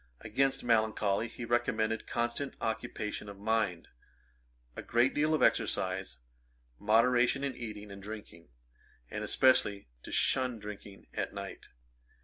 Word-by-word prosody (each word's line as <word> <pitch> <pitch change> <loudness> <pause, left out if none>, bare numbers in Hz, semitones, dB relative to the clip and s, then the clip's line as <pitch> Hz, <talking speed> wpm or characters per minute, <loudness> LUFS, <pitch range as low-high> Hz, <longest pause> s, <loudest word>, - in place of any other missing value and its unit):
Against 135 +5 +1
melancholy 110 -2 +2
he 120 +1 -7
recommended 115 -2 0
constant 120 +4 -2
occupation 105 -2 -3
of 100 - -9
mind, 105 -4 0 0.9
a - - -5
great 120 +3 +2
deal 155 +2 +2
of - - +1
exercise, 95 -7 +1 0.6
moderation 120 +5 +3
in 140 -2 -2
eating 105 -3 -7
and 100 0 -9
drinking, 100 -5 -9 0.6
and - - -3
especially 105 - +3
to - - -10
shun 130 -2 +3
drinking 105 -1 -9
at - - -3
night. - - -7
110 Hz, 125 wpm, -32 LUFS, 105-125 Hz, 0.9 s, moderation